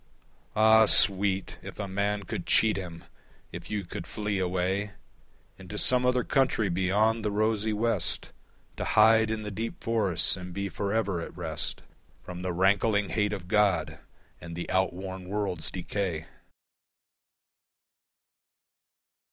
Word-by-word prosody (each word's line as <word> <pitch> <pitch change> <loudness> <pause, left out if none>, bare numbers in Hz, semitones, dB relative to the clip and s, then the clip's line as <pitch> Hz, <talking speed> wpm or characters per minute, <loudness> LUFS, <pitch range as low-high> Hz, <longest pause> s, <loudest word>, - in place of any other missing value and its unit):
Ah, 110 0 +6
sweet, 95 -1 +4
if - - -10
a 100 - -4
man 100 +1 -1
could 90 - -6
cheat 110 -1 +4
him! 85 -3 -7 0.5
If - - -9
you 105 -3 -3
could - - -7
flee 105 -2 -3
away 95 +3 -1 0.7
Into - - -8
some 125 0 +3
other 125 -1 +2
country 125 -7 +1
beyond 105 +5 +1
the 105 - 0
rosy 110 +1 0
West, 115 +2 -2 0.5
To - - -3
hide 110 +1 +4
in 110 -1 -3
the 105 - -5
deep 115 +4 -5
forests 110 -9 +1
and 90 -2 -9
be 100 0 -3
for 100 +1 -3
ever 100 -5 0
at 85 - -9
rest 80 -3 -4 0.4
From 90 -1 -8
the 90 0 -2
rankling 100 +3 +2
hate 105 -2 0
of 95 -4 -6
God 100 -5 +1 0.4
and 85 -1 -9
the 85 - -5
outworn 95 0 -2
world's 100 -5 -2
decay! 90 -3 -3
100 Hz, 135 wpm, -28 LUFS, 90-110 Hz, 0.7 s, Ah